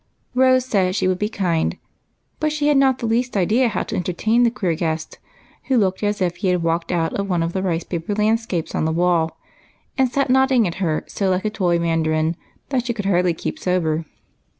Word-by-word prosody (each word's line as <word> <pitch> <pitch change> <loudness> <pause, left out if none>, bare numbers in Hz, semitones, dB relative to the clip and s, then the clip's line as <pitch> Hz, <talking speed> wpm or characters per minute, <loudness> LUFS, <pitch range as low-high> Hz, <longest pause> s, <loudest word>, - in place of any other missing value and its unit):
Rose 255 0 +4
said 190 -7 +1
she 190 - +1
would 185 -1 0
be 210 - 0
kind; 175 -7 -1 0.6
but 310 0 0
had 295 -1 +2
not 270 -2 +4
the 235 - -5
least 235 0 0
idea 220 +7 +3
how 225 - -1
to - - -5
entertain 200 +7 +1
the 240 - +5
queer 190 -7 -1
guest, 160 0 -3 0.5
who 265 - +2
looked 190 -4 +1
as 205 -1 -1
if 175 -1 -1
he 195 - -2
had 180 -2 +1
walked 165 +1 -1
out 165 -2 0
of 200 0 -2
one 175 -3 +1
of 165 +1 -3
the 190 - -1
rice 175 -3 -1
paper 170 +3 -4
landscapes 215 -5 0
on - - 0
the 160 - +1
wall, 170 -1 +1 0.6
and 260 -2 +3
sat 275 -1 +1
nodding 265 -3 +4
at 170 - -3
her 160 -4 0
so 195 -2 -1
like 185 +2 0
a 215 - 0
toy 180 -5 +1
Mandarin 165 -1 0 0.3
that 255 -3 -1
she 235 - -1
could 205 -3 -4
hardly 180 -3 +2
keep 310 - -5
sober. 165 - 0
190 Hz, 215 wpm, -21 LUFS, 170-235 Hz, 0.6 s, the